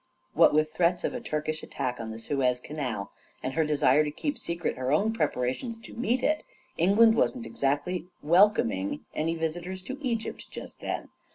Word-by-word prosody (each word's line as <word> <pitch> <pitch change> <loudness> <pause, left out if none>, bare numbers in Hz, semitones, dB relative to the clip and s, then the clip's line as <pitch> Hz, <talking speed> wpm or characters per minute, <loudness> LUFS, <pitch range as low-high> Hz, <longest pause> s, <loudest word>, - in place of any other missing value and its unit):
What - - +6
with 155 +1 +2
threats 175 +1 +2
of - - -1
a 250 - -4
Turkish 155 -6 -2
attack 125 -3 -3
on 115 -1 -5
the 110 - -6
Suez 125 +1 0
Canal 125 -8 -4 0.3
and 130 - -2
her 160 - +2
desire 150 -1 +4
to 150 - -2
keep 285 - -3
secret 170 0 -2
her 130 +1 -2
own 205 +9 +3
preparations 150 - -1
to 235 - -11
meet 245 +2 0
it, 310 0 +2 0.3
England 210 +6 +5
wasn't 235 +1 +1
exactly 145 +7 -1 0.2
wel 175 +7 +7
coming 105 - -2
any 165 +2 0
visitors 175 +3 -3
to 265 +5 -6
Egypt 235 -5 -3
just - - -9
then. - - -4
160 Hz, 180 wpm, -28 LUFS, 140-210 Hz, 0.3 s, wel